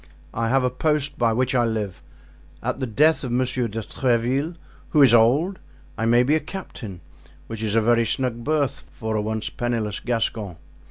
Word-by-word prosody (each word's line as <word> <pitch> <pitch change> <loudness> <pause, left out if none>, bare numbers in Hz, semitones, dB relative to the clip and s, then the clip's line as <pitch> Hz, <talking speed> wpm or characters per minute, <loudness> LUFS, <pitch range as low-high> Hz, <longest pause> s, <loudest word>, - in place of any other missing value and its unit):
I 115 0 -1
have 135 +1 +3
a 125 - +1
post 145 +1 -1
by 115 -1 +3
which 125 +3 0
I 120 -2 +3
live; 110 -5 -2 0.6
at - - -2
the 130 - -2
death 150 +9 +3
of 125 - -3
Monsieur 125 0 0
de 110 +1 -5
Tréville, 130 +8 0 0.3
who 150 -3 +5
is 125 -4 +6
old, 140 - +4 0.4
I 115 +1 -1
may 120 +1 +5
be 140 +4 +2
a 155 - +3
captain, 125 - -8 0.4
which 110 -1 -7
is 110 -1 -1
a 115 - +4
very 115 +1 +3
snug 125 -3 -1
berth 140 -2 -1
for 110 0 -4
a 105 - +1
once 110 +1 -3
penniless 115 -4 -2
Gascon. 110 -5 -2
120 Hz, 185 wpm, -23 LUFS, 110-135 Hz, 0.6 s, is